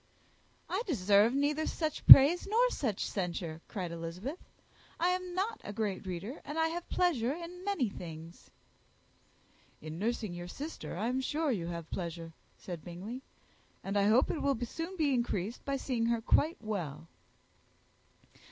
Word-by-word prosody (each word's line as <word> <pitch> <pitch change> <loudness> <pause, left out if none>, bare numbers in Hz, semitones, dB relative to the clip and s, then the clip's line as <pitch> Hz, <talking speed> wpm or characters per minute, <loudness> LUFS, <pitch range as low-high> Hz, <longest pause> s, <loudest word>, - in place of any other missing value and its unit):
"I 380 - -1
deserve 205 - +4
neither 295 +2 +1
such 310 -3 -3
praise 305 +8 +11
nor 485 +4 +3
such 220 -8 -2
censure," 170 -4 -4
cried 185 -6 -5
Elizabeth; 175 - -6 0.6
"I 350 - +3
am 365 -1 -2
not 430 +4 -2
a - - -6
great 205 -2 -3
reader, 195 - -5
and 295 - -6
I 320 0 +2
have 345 +1 -6
pleasure 280 -9 +1
in 345 +2 -8
many 390 - 0
things." 165 -3 -10 1.3
"In 155 +2 -7
nursing 220 -2 -2
your 175 0 -7
sister 285 - -7
I 215 +5 -1
am 255 +2 0
sure 300 +2 0
you 180 -8 -2
have 170 -2 -5
pleasure," 170 -2 -5 0.2
said 175 -4 -8
Bingley; 195 +9 -7 0.6
"and 195 +1 -4
I 200 -1 +3
hope 230 +5 +4
it 315 - -3
will 275 -4 +1
soon 335 +9 -6
be 295 -4 +2
increased 235 -3 -2
by 275 - -1
seeing 240 -4 -1
her 235 0 +1
quite 305 +8 +2
well." 175 -9 -5
230 Hz, 155 wpm, -32 LUFS, -, 1.3 s, praise